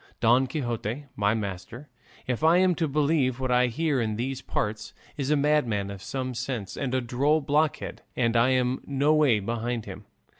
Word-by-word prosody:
Don 120 +3 +4
Quixote, 120 -1 -3
my 105 +1 +1
master, 110 +6 -6 0.4
if 125 +2 -2
I 165 +2 +6
am 185 0 +4
to 165 -1 -1
believe 145 -3 +1
what 130 -1 -1
I 125 0 +4
hear 145 +1 0
in 110 -2 -1
these 130 +3 -3
parts, 105 +1 -3 0.2
is 140 -2 -3
a 150 - +4
madman 140 -9 +1
of 100 -1 -8
some 130 +6 -4
sense, 120 -5 -4
and 130 -2 -2
a 130 - +1
droll 135 +6 +1
blockhead, 150 +1 -1
and 115 -2 +1
I 115 +2 +4
am 130 0 +1
no 140 +2 +2
way 145 -8 +4
behind 115 +2 -3
him. - - -9
130 Hz, 185 wpm, -26 LUFS, 115-145 Hz, 0.4 s, I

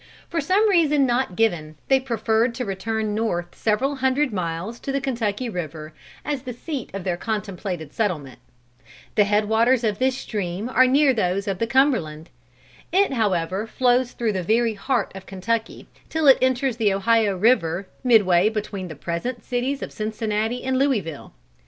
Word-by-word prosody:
For 335 -1 -1
some 385 +9 +3
reason 305 -8 +3
not 245 -6 0
given, 165 -9 0
they 270 -1 +4
preferred 230 -2 0
to 250 - -3
return 215 +2 -2
north 175 -6 -2
several 260 +6 0
hundred 265 0 +1
miles 180 +5 -3
to 275 - -4
the 275 - 0
Kentucky 245 -3 -2
river, 155 -6 -6 0.3
as 290 -3 -2
the 255 -2 -6
seat 270 +1 -5
of 195 - -4
their 175 -2 -1
contemplated 190 -7 -4
settlement. 155 - -2 0.7
The 210 -1 +4
head 210 +1 +2
waters 230 +3 +3
of 210 -3 0
this 260 0 +1
stream 205 -1 -4
are 255 0 +5
near 275 +1 +4
those 195 -2 -1
of 195 -2 -2
the 230 - 0
Cumberland. 225 - +1 0.6
It 390 -5 +3
however 195 -3 0
flows 250 +1 +1
through 225 -3 -1
the 190 - -1
very 225 +5 +2
heart 230 +2 -1
of 190 0 -10
Kentucky, 220 +4 -3 0.2
till 320 -1 -1
it 270 - +8
enters 260 -1 +1
the 215 -4 +2
Ohio 200 0 +2
river, 185 -4 +2 0.2
midway 205 -6 +5
between 205 -3 -4
the 160 - -8
present 175 - -4
cities 255 +3 -2
of - - -7
Cincinnati 220 +2 -2
and 260 0 0
Louisville. 210 - -1
220 Hz, 165 wpm, -23 LUFS, 190-255 Hz, 0.7 s, it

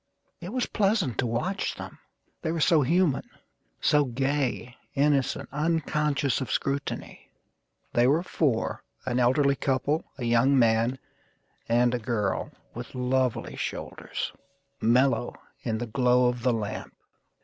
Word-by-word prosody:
It 175 - -7
was 255 +1 0
pleasant 195 - +1
to 125 - +2
watch 150 - -1
them, - - -9 0.4
they 160 - -1
were 165 - -2
so 160 0 +4
human; 165 +1 +2 0.6
So 150 -1 +4
gay, 130 -1 -1 0.2
innocent, 140 -2 +1
unconscious 150 -3 0
of 130 - -3
scrutiny. 140 +1 -3 0.6
They 120 +1 +4
were 155 +6 +3
four: 140 -10 0 0.2
an 120 - 0
elderly 140 +3 +3
couple, 140 +4 0
A 125 - -4
young 120 +4 +4
man, 115 +1 +3 0.7
and 120 +1 +3
a 125 - 0
girl 110 -4 -1 0.2
with 120 +2 -8
lovely 125 -2 0
shoulders - - -4 0.5
Mellow 120 +1 +3 0.3
in 110 -2 -1
the 120 - -3
glow 125 +1 +3
of 125 -1 -4
the 125 - +2
lamp. 110 -3 -4
130 Hz, 130 wpm, -27 LUFS, 120-150 Hz, 0.7 s, so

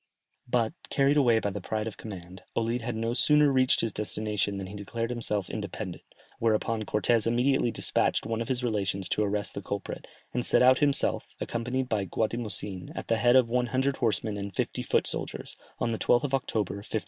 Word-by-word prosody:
But, 120 +2 +1 0.2
carried 140 +1 +3
away 120 -6 +4
by 105 -2 -1
the 100 0 -5
pride 110 +3 -2
of 110 - -5
command, 95 -3 -9
Olid 115 +1 0
had 120 0 -3
no 115 +1 -1
sooner 150 +3 +5
reached 130 -1 +3
his 115 -3 -2
destination 105 -1 -2
than 95 - -4
he 95 - -9
declared 115 +4 -4
himself 105 -5 0
independent, 100 -3 -5 0.4
whereupon 110 0 0
Cortès 110 +2 +2
immediately 120 +2 +2
despatched - - 0
one 115 0 -2
of 115 - -3
his 125 -1 -1
relations 100 -5 -1
to - - +1
arrest 105 0 -1
the 100 - -5
culprit, 100 +1 -5 0.3
and 125 - 0
set - - +5
out 130 +1 +6
himself, 145 -2 +3
accompanied 125 +2 -2
by 105 -5 -1
Guatimozin, 105 -2 -2
at - - -6
the 115 - +3
head 120 +2 +4
of 130 -2 +6
one 125 +1 0
hundred 130 +3 0
horsemen 110 -3 0
and 100 -1 -6
fifty - - -2
foot - - +1
soldiers, - - -5 0.2
on 115 - -1
the 110 - -3
12th 120 - +3
of 140 -2 -3
October, 110 -7 -1
1524. 105 +2 -3
115 Hz, 195 wpm, -28 LUFS, 105-125 Hz, 0.4 s, out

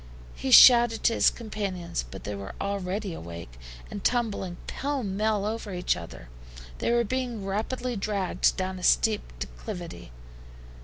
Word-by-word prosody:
He 265 - -4
shouted 240 -3 +8
to 230 - +4
his - - +5
companions, 195 - -4
but - - -9
they 105 - -4
were 100 -1 -7
already 200 0 -3
awake, 85 - -9 0.3
and 205 - -6
tumbling 210 -7 0
pell 280 -2 -3
mell 205 +1 0
over 215 -1 -3
each 180 - +1
other. 85 -7 -9 0.5
They - - 0
were 235 0 +3
being 240 -3 -3
rapidly 235 +5 -2
dragged 200 -2 0
down 185 0 -3
a - - -10
steep 215 +2 +3 0.2
declivity. - - -7
200 Hz, 145 wpm, -27 LUFS, 180-230 Hz, 0.5 s, shouted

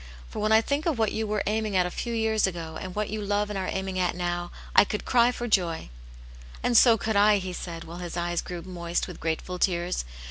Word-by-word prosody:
For - - -6
whea 215 +1 +1
I - - +4
think 285 +7 -1
of 315 -6 +1
what. 220 -2 +2
you 220 0 -2
were 210 -1 0
aiming 215 -1 -1
at 180 -1 +4
a 180 - -3
few 235 - -4
years 220 -2 +2
ago, 165 -3 -5
and 185 -2 -6
what 210 -1 -2
you 215 0 -3
love 205 +1 0
and 200 - -2
are 185 - -2
aiming 190 -1 -2
at 180 -2 +1
now, 175 0 -2 0.3
I - - +9
could 210 +1 -4
cry 240 -1 +4
for 240 -1 -4
joy." 175 - +1 0.7
"And 245 - +1
so 230 0 +7
could 220 +1 -2
I!" 205 +1 +6
he 185 -2 -4
said, 170 -2 -6
while 170 +2 -9
his 175 -1 -5
eyes 175 0 -1
grew 175 -2 -7
moist 175 -1 -3
with 180 - -9
grateful 165 +3 -3
tears. 175 -1 0
190 Hz, 245 wpm, -27 LUFS, 175-215 Hz, 0.7 s, I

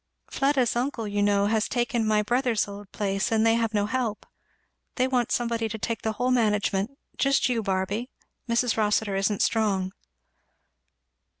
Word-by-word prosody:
"Fleda's 270 -5 +1
uncle, 240 -2 -2
you 205 0 -1
know, 200 0 +3
has 220 +1 +1
taken 240 -2 0
my 210 -1 +3
brother's 240 -1 +1
old 200 -1 -10
place, 195 -1 -1
and 220 0 +3
they 225 - +5
have 230 -1 +1
no 205 -2 +1
help. 230 -1 -2 0.7
They 255 0 +2
want 245 -2 0
somebody 230 -2 0
to 220 - -4
take 225 +1 -3
the 220 - -1
whole 250 +3 0
management 210 0 +1 0.2
just 275 0 +3
you, 235 -2 0
Barby. 195 +4 -2 0.4
Mrs. 235 0 +1
Rossitur 210 -1 +1
isn't 195 +1 +1
strong." 195 -4 +1
220 Hz, 160 wpm, -26 LUFS, 205-240 Hz, 0.7 s, they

